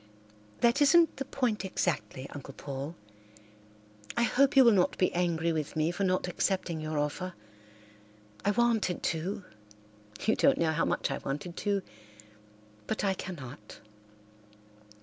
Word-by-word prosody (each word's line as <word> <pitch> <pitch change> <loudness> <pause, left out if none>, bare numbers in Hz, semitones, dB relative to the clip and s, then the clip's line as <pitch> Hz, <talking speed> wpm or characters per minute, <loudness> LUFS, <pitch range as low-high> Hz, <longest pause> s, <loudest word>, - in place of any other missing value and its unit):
"That 235 +5 +4
isn't 330 +3 +5
the 270 - -3
point 235 -8 -1
exactly, 175 -7 -2
Uncle 140 -1 -9
Paul. 140 +3 -5 1.2
I 235 - +3
hope 275 +4 +3
you 270 - +9
will 235 - +7
not 190 -4 +2
be 185 - +2
angry 170 -2 +1
with 155 -1 -3
me 155 +1 +1
for 195 +3 -2
not 185 -1 +1
accepting 180 -2 -1
your 155 0 -3
offer. 170 +5 -2 1.1
I 200 - +2
wanted 220 -4 +1
to—you 105 - -4
don't 275 - +4
know 165 -1 +2
how 160 +1 +1
much - - 0
I - - -2
wanted 150 +6 -5
to—but 105 - -6
I 195 -1 +2
cannot. 150 -8 -8
170 Hz, 130 wpm, -30 LUFS, 135-200 Hz, 1.2 s, you